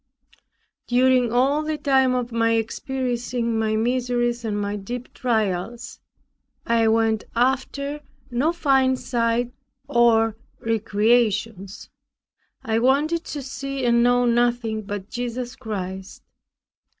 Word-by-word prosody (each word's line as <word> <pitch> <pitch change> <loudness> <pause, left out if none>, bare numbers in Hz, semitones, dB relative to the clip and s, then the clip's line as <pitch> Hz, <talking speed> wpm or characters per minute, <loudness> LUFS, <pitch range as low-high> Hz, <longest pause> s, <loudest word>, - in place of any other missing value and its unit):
During 250 -1 +3
all 270 +5 +2
the 310 0 -2
time 265 -4 +3
of 245 -1 -2
my 230 0 +2
experiencing 240 0 -2
my 220 -1 0
miseries 240 +1 0
and 210 -2 -2
my 205 0 -2
deep 240 +5 -6
trials, 230 +2 -2 0.7
I 230 -1 +2
went 220 -1 +2
after 270 +4 0 0.3
no 265 +7 +1
fine 270 -6 +2
sights 235 -1 0 0.4
or 230 -4 +3 0.2
recreations. 220 -2 0 0.8
I 225 0 0
wanted 295 +7 +2
to 290 -2 -5
see 275 0 -4
and 235 0 +4
know 245 +1 +3
nothing 235 -2 +1
but 200 -1 -6
Jesus 245 0 -4
Christ. 190 -6 -6
240 Hz, 110 wpm, -23 LUFS, 225-260 Hz, 0.8 s, and